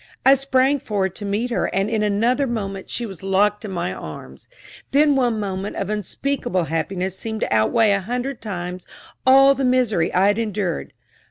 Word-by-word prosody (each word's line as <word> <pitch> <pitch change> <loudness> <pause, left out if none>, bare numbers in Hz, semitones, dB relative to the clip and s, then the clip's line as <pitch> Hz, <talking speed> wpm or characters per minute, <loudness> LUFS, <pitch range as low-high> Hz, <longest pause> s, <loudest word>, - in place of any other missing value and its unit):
I 270 - +8
sprang 275 +1 +2
forward 195 -6 -2
to 205 - -6
meet 215 +5 -1
her, - - 0
and 195 +1 0
in 220 -1 -1
another 230 +7 +1
moment 195 -5 -4
she 240 - -3
was 195 -4 -9
locked 205 +2 +1
in - - -5
my 175 -1 -3
arms. - - -10 0.5
That 295 +2 +5
one 245 -5 +2
moment 195 -1 -4
of 195 +1 -3
unspeakable 210 -1 -2
happiness 180 +4 -2
seemed 220 +2 -5
to - - 0
out 110 0 +2
weigh 220 -2 +4
a 200 - 0
hundred 245 +5 -4
times 180 -4 -6 0.4
all 270 +1 +7
the 270 0 -3
misery 245 -9 +2
I 185 +2 +3
had 205 +2 +2
endured. 205 -6 -3
210 Hz, 185 wpm, -21 LUFS, 190-250 Hz, 0.5 s, I